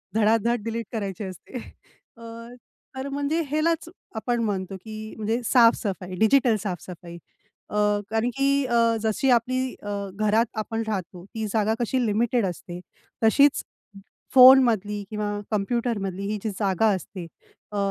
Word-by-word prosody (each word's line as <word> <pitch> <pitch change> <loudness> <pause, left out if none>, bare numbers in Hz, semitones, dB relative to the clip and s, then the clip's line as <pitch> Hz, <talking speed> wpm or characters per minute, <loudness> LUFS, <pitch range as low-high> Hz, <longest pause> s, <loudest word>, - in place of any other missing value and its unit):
धडा-धड 225 +1 +2
delete 230 +1 -3
करायची 200 -3 -4
असते. 190 +6 -8 0.6
अ, - - -16 0.7
तर 265 +1 -4
म्हणजे 285 +4 -1
ह्यालाच 325 +2 0 0.3
आपण 235 +2 -1
म्हणतो 195 -3 -2
की 215 0 -7
म्हणजे 220 +3 -1
साफ-सफाई, 210 -6 +2
डिजिटल 235 +1 +4
साफ-सफाई. 175 -3 -7 0.5
अ, 210 - -3 0.3
कारण 225 +2 0
की 275 0 +2 0.2
अ, 230 -2 +3
जशी 220 +5 0
आपली 255 +2 +1
अ, 205 - -4 0.2
घरात 215 +2 +2
आपण 225 +1 -2
राहतो, 185 -4 -4
ती 220 -1 -2
जागा 220 -1 +2
कशी 245 +1 0
लिमिटेड 225 +1 +1
असते. 175 -1 -6 0.4
तशीच 280 +6 +4 0.7
फोनमधली 240 -6 +6
किंवा 210 -1 -2 0.2
कॉम्प्युटरमधली 210 -3 -1
ही 210 +1 -2
जी 220 - -2
जागा 200 0 +1
असते 185 0 -7 0.5
अ, - - -4
220 Hz, 130 wpm, -25 LUFS, 205-240 Hz, 0.7 s, फोनमधली